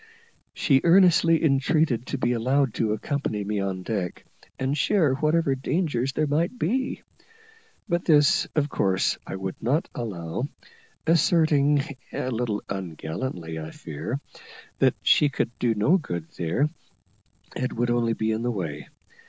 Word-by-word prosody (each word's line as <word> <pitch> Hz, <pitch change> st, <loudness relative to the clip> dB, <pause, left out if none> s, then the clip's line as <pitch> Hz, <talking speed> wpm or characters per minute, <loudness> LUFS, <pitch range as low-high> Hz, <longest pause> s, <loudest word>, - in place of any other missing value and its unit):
She 135 Hz, -3 st, +3 dB
earnestly 170 Hz, -2 st, +5 dB
entreated 135 Hz, -3 st, +2 dB
to 140 Hz, -, -2 dB
be 120 Hz, -1 st, 0 dB
allowed 130 Hz, +1 st, +1 dB
to 110 Hz, 0 st, 0 dB
accompany 110 Hz, -2 st, -2 dB
me 105 Hz, +1 st, -2 dB
on 95 Hz, -1 st, -3 dB
deck, 95 Hz, -4 st, -3 dB, 0.3 s
and 130 Hz, +2 st, -1 dB
share 155 Hz, -1 st, +2 dB
whatever 155 Hz, +1 st, +2 dB
danger 135 Hz, -1 st, -1 dB
there 155 Hz, -, +2 dB
might 165 Hz, -, 0 dB
be, 255 Hz, +7 st, -1 dB, 0.8 s
but 175 Hz, -3 st, -1 dB
this 150 Hz, -3 st, +4 dB
of 150 Hz, -2 st, +2 dB
course 95 Hz, -9 st, 0 dB
I -, -, -4 dB
would 95 Hz, 0 st, -5 dB
not 145 Hz, +8 st, +1 dB
allow, 95 Hz, -1 st, -4 dB, 0.6 s
asserting, 150 Hz, -3 st, +3 dB, 0.3 s
a 130 Hz, -, -3 dB
little 115 Hz, -3 st, -2 dB
ungallantly, 85 Hz, -1 st, -5 dB
I 80 Hz, 0 st, -6 dB
fear, 80 Hz, -, -5 dB, 0.6 s
that -, -, +4 dB
she 150 Hz, -, +5 dB
could 120 Hz, -, -2 dB
do 115 Hz, -2 st, +1 dB
no 145 Hz, -, +3 dB
good 85 Hz, -, -6 dB
there, 85 Hz, -, 0 dB, 0.9 s
and 125 Hz, 0 st, -2 dB
would 120 Hz, +1 st, 0 dB
only 120 Hz, -1 st, +1 dB
be 110 Hz, 0 st, -1 dB
in 110 Hz, +1 st, -1 dB
the 120 Hz, -, -1 dB
way. 80 Hz, -10 st, -4 dB
125 Hz, 145 wpm, -25 LUFS, 105-150 Hz, 0.9 s, earnestly